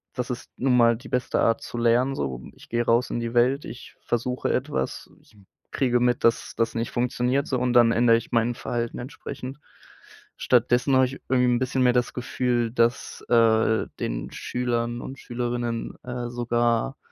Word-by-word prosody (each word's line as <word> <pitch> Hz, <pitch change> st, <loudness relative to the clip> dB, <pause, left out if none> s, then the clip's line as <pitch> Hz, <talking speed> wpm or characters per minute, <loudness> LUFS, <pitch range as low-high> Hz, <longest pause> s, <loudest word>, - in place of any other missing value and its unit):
Das 125 Hz, -1 st, -3 dB
ist 125 Hz, -, -6 dB
nun 130 Hz, -1 st, +2 dB
mal 115 Hz, -1 st, +5 dB
die 125 Hz, -, -13 dB
beste 125 Hz, -1 st, 0 dB
Art 115 Hz, -, +2 dB
zu -, -, -7 dB
lernen 120 Hz, +3 st, +2 dB
so. 65 Hz, -3 st, -4 dB
Ich -, -, -17 dB
gehe 120 Hz, 0 st, 0 dB
raus 115 Hz, +2 st, +2 dB
in -, -, -2 dB
die 115 Hz, 0 st, -4 dB
Welt, 125 Hz, +4 st, +3 dB
ich 120 Hz, -, -10 dB
versuche 125 Hz, +2 st, -1 dB
etwas, 130 Hz, -, -3 dB
ich 110 Hz, -, -25 dB, 0.3 s
kriege 125 Hz, -2 st, +1 dB
mit, 120 Hz, 0 st, +1 dB
dass 115 Hz, -1 st, +1 dB
das 115 Hz, 0 st, 0 dB
nicht 115 Hz, 0 st, -2 dB
funktioniert 125 Hz, +3 st, 0 dB
so, 130 Hz, -, 0 dB
und 125 Hz, 0 st, 0 dB
dann 120 Hz, -2 st, +6 dB
ändere 115 Hz, 0 st, +4 dB
ich 115 Hz, -, -7 dB
mein 115 Hz, 0 st, +2 dB
Verhalten 120 Hz, 0 st, -3 dB
entsprechend. 130 Hz, +1 st, -8 dB, 0.8 s
Stattdessen 125 Hz, +2 st, +2 dB
habe 130 Hz, 0 st, +5 dB
ich 130 Hz, +2 st, -7 dB
irgendwie 125 Hz, -1 st, +3 dB
'n -, -, 0 dB
bisschen 130 Hz, 0 st, 0 dB
mehr 125 Hz, -1 st, +4 dB
das 125 Hz, 0 st, 0 dB
Gefühl, 125 Hz, -1 st, -1 dB
dass, 115 Hz, 0 st, 0 dB
äh, 110 Hz, -1 st, +3 dB
den -, -, -3 dB
Schülern 120 Hz, -1 st, -2 dB
und 135 Hz, 0 st, -8 dB
Schülerinnen, 120 Hz, -1 st, -3 dB
äh, 125 Hz, -1 st, -5 dB
sogar 120 Hz, +2 st, 0 dB
120 Hz, 180 wpm, -25 LUFS, 115-125 Hz, 0.8 s, dann